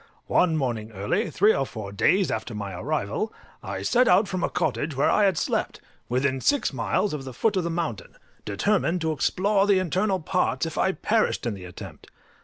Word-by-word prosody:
One 165 -3 +2
morning 115 -6 -2
early, 105 - -1
three 215 +1 +4
or 135 - 0
four 110 -6 -7
days 185 - +2
after 115 - -4
my 100 -2 -5
arrival, 140 - -2 0.3
I - - -5
set 250 +1 +3
out 195 +3 +5
from 185 -2 -3
a - - +1
cottage 150 -1 -1
where 140 - +2
I 210 - +4
had 195 - +2
slept, - - -1 0.3
within 130 +2 0
six 285 - +1
miles 130 - 0
of 145 -3 -4
the 130 -2 -8
foot 210 - +1
of 185 - +1
the 170 - -2
mountain, 165 -9 -4 0.3
determined 180 - 0
to 160 0 0
explore 195 +6 +1
the 200 -2 +4
internal 185 +2 0
parts, 180 +1 0
if 165 - -5
I 190 - +1
perished 220 - 0
in 120 - -1
the 95 -2 -9
attempt. 90 +1 -10
160 Hz, 200 wpm, -25 LUFS, 120-195 Hz, 0.3 s, out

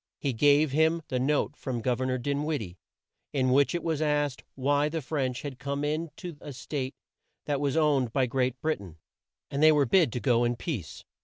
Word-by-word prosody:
He 140 -3 -1
gave 145 +4 +4
him 160 +3 +2
the 130 - 0
note 140 -1 +1
from 125 -6 -4
Gov 125 -1 0
er 130 - 0
nor 130 0 0
Din 140 +3 -1
wid 155 -1 -1
die, 90 -4 -8 0.6
in 130 -3 +2
which 140 +5 +3
it 170 - -2
was 160 -2 -1
asked 145 -3 0
why 145 +2 +2
the 165 +1 -2
French 130 -3 -2
had 140 -4 -6
come 140 +1 -3
in 155 +3 -1
to 175 -6 -7
a 145 - -8
State 130 +1 -4 0.5
that 145 -2 -1
was 145 +1 0
owned 145 -6 +2
by 130 +2 +2
Great 125 0 -1
Brit 155 -7 0
ain, 85 -5 -11 0.5
and 140 - -1
they 155 0 +8
were 145 -2 +4
bid 165 -1 +4
to 125 - -2
go 120 -2 +2
in 120 0 +1
peace. 120 - -5
140 Hz, 220 wpm, -28 LUFS, 130-150 Hz, 0.6 s, they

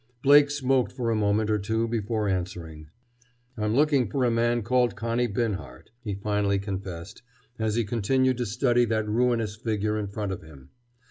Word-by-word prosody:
Blake 145 +1 +7
smoked 135 -3 +1
for 120 -3 -2
a - - +1
moment 105 +1 +1
or 105 - +1
two 110 +3 -1
before 110 -1 -1
answering. 85 -5 -4 0.7
"I'm 105 -1 -1
looking 140 -5 +3
for 130 +2 0
a 120 - +2
man 120 0 +1
called 120 -2 +2
Connie 115 +3 0
Binhart," 110 -2 -4
he 105 -4 -3
finally 100 0 0
confessed, 95 -1 -6 0.4
as 110 -1 0
he 120 - +2
continued 125 +4 +1
to 120 - -1
study 120 +2 +2
that 110 -1 -1
ruinous 115 -1 +1
figure 110 -1 -1
in 105 - -3
front 100 0 -4
of 95 - -5
him. 70 -4 -15
110 Hz, 175 wpm, -26 LUFS, 100-120 Hz, 0.7 s, Blake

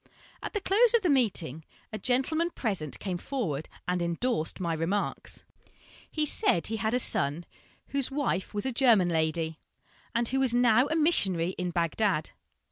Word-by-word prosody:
At - - -5
the 415 - -1
close 445 +5 +4
of 455 - +3
the 350 - +3
meeting, 180 - 0 0.3
a 215 - -3
gentleman 290 +7 +1
present 195 - -3
came 180 -3 -4
forward 165 - -3 0.2
and 180 0 0
endorsed 170 +1 -1
my 170 -3 -1
remarks. 165 +6 -2 0.7
He 310 -1 -1
said 175 - +2
he 225 - -3
had 220 +3 0
a - - +4
son 155 - +1 0.4
whose 275 -2 0
wife 270 -9 -1
was 210 +2 -3
a 265 - +1
German 230 -8 +4
lady, 160 -1 -1 0.6
and 235 0 +1
who 265 +3 0
was 260 -3 +1
now 245 +1 +4
a 315 - -1
missionary 195 - +2
in 180 -1 -3
Bagdad. 170 0 0
215 Hz, 165 wpm, -28 LUFS, 170-265 Hz, 0.7 s, close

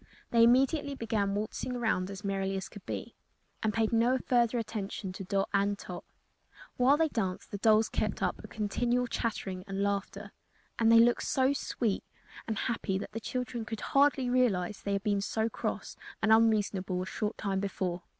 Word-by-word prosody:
They 230 -1 +5
immediately 275 +4 +3
began 215 -5 -1
waltzing 215 +4 -3
around 220 -6 0
as 200 +1 -8
merrily 195 -1 -1
as 190 - -5
could 205 - -12
be, - - -5 0.5
and 220 - +1
paid 225 +1 0
no 235 +3 +3
further 240 -1 +2
attention 210 -4 -4
to 195 - -6
Dot 195 +1 0
and 200 0 +2
Tot. 180 -3 -8 0.7
While 260 +4 +4
they 320 0 +3
danced 195 -10 -3
the 200 - -4
dolls 220 +1 +4
kept - - -2
up - - -1
a - - -8
continual 240 +4 0
chattering 210 -6 -3
and 195 0 -2
laughter, 200 -1 -2 0.5
and 225 -1 +5
they 230 - +8
looked 240 +1 +4
so 265 +1 +3
sweet 230 -6 -1 0.4
and 220 -1 -2
happy 215 -5 -1
that 195 - -6
the 225 - -4
children 245 0 -3
could 220 -1 -6
hardly 275 -2 +3
realize 210 -7 +1
they 200 - -2
had 200 0 -1
been 205 -2 +1
so 220 +2 -1
cross - - -4 0.2
and 220 - +4
unreasonable 205 -5 +2
a - - -5
short 210 +2 -3
time 195 -2 -1
before. 185 -2 -2
220 Hz, 180 wpm, -30 LUFS, 195-240 Hz, 0.7 s, they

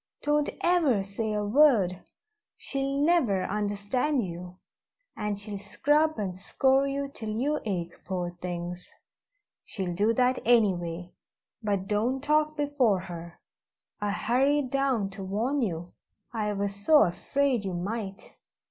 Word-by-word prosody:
Don't 295 0 +2
ever 315 - +3
say 205 +3 -3
a 210 -1 -1
word 210 -7 +4 0.5
she'll 275 0 -2
never 255 - +3
understand 210 +7 0
you, 180 +1 -8 0.6
and 210 -2 -2
she'll 205 0 -6
scrub 300 +9 +1
and 190 -4 -3
scour 265 +8 +2
you 280 0 -2
till 225 -5 -7
you 270 +8 0
ache, 175 -5 -2
poor 175 -2 -3
things! 175 0 -5 0.7
she'll 185 -3 -4
do 205 +6 +2
that 255 +1 +2
anyway, 180 -7 +2 0.5
but 200 -3 -1
don't 235 +6 0
talk 305 +1 +2
before 275 -10 +2
her. 170 -2 -9 0.6
I 205 - 0
hurried 260 +6 +1
down 265 -8 +1
to 195 0 -7
warn 230 +9 -1
you 175 -5 -3 0.4
I 210 -2 -1
was 200 0 -2
so 255 +9 +5
afraid 240 +7 0
you 190 -2 -3
might." 195 +2 -5
210 Hz, 130 wpm, -28 LUFS, 190-275 Hz, 0.7 s, so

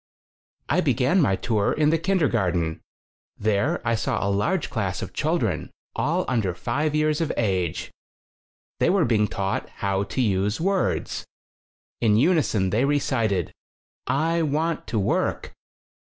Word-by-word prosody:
I - - +2
began 140 +9 +2
my 95 -10 +3
tour 105 0 0
in 150 0 +2
the 165 - +2
kindergar 150 - +1
ten. 80 -2 -2 0.6
There 110 - +1
I 115 - +3
saw 115 - -1
a 100 - +1
large 165 - 0
class 100 -7 -2
of - - -7
children, - - -1 0.3
all 170 +4 0
under 110 -8 0
five 145 - -1
years 155 +1 +1
of 160 - 0
age. 95 -7 -1 0.9
They - - +3
were 190 -4 +3
being 110 -3 +2
taught 100 -2 -2
how 100 -1 -1
to 130 - -5
use 105 -1 +1
words. 190 +3 -1 0.7
In 105 -2 +3
unison 125 - +2
they 110 +5 +2
recited: 115 - 0 0.5
"I 165 +4 +1
vvant 155 +2 -1
to 115 - -2
work!" 100 - -1
120 Hz, 140 wpm, -24 LUFS, 100-155 Hz, 0.9 s, my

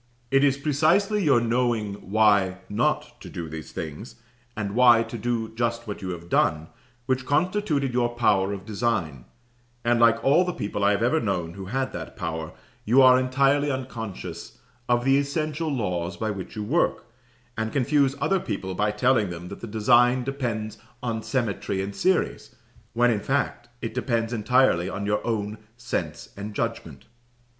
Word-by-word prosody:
"It 135 +1 +4
is 135 -1 +3
precisely 160 +9 +2
your 140 -7 +5
knowing 115 -3 0 0.2
why 100 -3 +3
not 105 - -1
to - - -9
do 85 -2 -6
these 80 0 -8
things, 80 +8 -7 0.4
and 100 -2 -3
why 120 -1 +6
to 115 +1 -8
do 115 0 -2
just 115 +1 -2
what 105 - -5
you 95 - -4
have 85 -1 -6
done, 80 -2 +1 0.4
which 130 0 0
constituted 150 -2 0
your 120 -1 +2
power 100 -5 +2
of 100 -1 -6
design; 100 - -2 0.6
and 120 0 +3
like 115 0 +4
all 150 +7 +5
the 180 -1 -2
people 105 0 -3
I 100 - +5
have 105 +2 +1
ever 155 +7 +3
known 90 - -2
who 95 0 -8
had 130 +6 -2
that - - -7
power, 80 -4 -4 0.3
you 120 +5 +4
are 130 0 +7
entirely 135 +3 +2
unconscious 125 -7 -6 0.3
of 120 0 +2
the 135 +1 +4
essential 155 +2 -2
laws 90 -8 -2
by 110 +1 -2
which 95 0 -7
you 105 - -3
work, 150 +12 0 0.5
and 110 -1 -2
confuse 140 +1 +2
other 195 - +1
people 95 - -4
by 105 +3 +1
telling 105 -1 +2
them 85 +1 -7
that - - -9
the 115 - -6
design 120 +3 +3
depends 120 -6 -3 0.2
on 115 -2 -2
symmetry 110 -6 -2
and 100 +1 -4
series, 185 -1 0 0.4
when, 120 +1 +3
in 110 - 0
fact, 120 -1 -2
it 115 - -3
depends 115 -2 -1
entirely 110 -5 +2
on 100 +1 -4
your 105 +1 0
own 105 -2 -2 0.2
sense 85 -11 -4
and 105 +1 -7
judgment." 85 - -4
115 Hz, 170 wpm, -25 LUFS, 100-130 Hz, 0.6 s, are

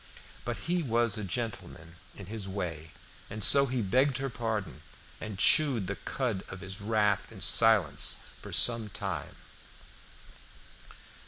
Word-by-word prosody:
But 120 -1 -3
he 175 +1 +1
was 120 -5 +1
a 110 - -4
gentleman 95 -6 -5 0.2
in 100 - -8
his 105 0 -5
way, 85 -5 -5 0.4
and 105 0 -4
so 140 -1 +6
he 125 -2 -1
begged 130 +6 +2
her 135 -1 -3
pardon, 110 -8 -4 0.4
and 105 -3 -6
chewed 130 -2 +5
the 100 +2 -4
cud 110 +2 -3
of 95 - -8
his 95 +2 -6
wrath 105 -1 0
in - - -11
silence 100 -11 +2 0.2
for - - -9
some 115 -3 +4
time. 95 -7 -5
105 Hz, 140 wpm, -29 LUFS, 95-120 Hz, 0.4 s, so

